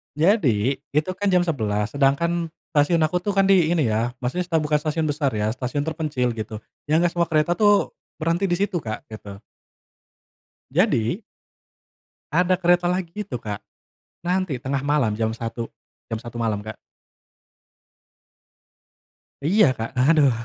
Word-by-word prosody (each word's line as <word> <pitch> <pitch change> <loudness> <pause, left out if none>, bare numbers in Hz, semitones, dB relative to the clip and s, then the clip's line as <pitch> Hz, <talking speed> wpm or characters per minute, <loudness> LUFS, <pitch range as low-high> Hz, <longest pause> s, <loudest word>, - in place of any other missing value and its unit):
Jadi, 140 - +2
itu 150 +5 +1
kan 205 +2 -1
jam 180 -1 +4
11.00. 110 -9 -1
Sedangkan 165 +4 +1 0.2
stasiun 150 +4 +4
aku 175 +3 0
tuh 205 - 0
kan 195 -1 +3
di 180 -5 +4
ini 160 -7 +2
ya, 110 +2 0
maksudnya 130 +9 -1
sta 170 -2 +1
bukan 150 0 0
stasiun 155 +1 -1
besar 145 -2 0
ya, 105 -2 -1
stasiun 130 +4 -2
terpencil, 140 -7 -1
gitu. 110 0 -5 0.3
Yang 165 +3 +4
nggak - - -3
semua 170 -1 +2
kereta 155 +2 +2
tuh, 205 0 +3 0.2
berhenti 170 +4 +1
di - - +4
situ, 200 -3 0
Kak, 110 -1 -6
gitu. 100 -2 -9 1.3
Jadi 165 - +1 1.1
ada 180 +1 +3
kereta 175 0 +3
lagi 180 -2 -2
itu, 205 -9 -5
Kak, 105 -3 -5 0.6
nanti 180 -7 -1
tengah 135 +1 -2
malam 140 -7 +1
jam 110 0 0
01.00. 115 0 -5 0.4
Jam 110 - -2
01.00 120 -1 -9
malam, 110 -3 -1
Kak. 110 +1 -8 2.7
Iya, 195 +7 +4
Kak, 115 0 -3
aduh. 145 +1 +5
150 Hz, 145 wpm, -23 LUFS, 120-175 Hz, 2.7 s, aduh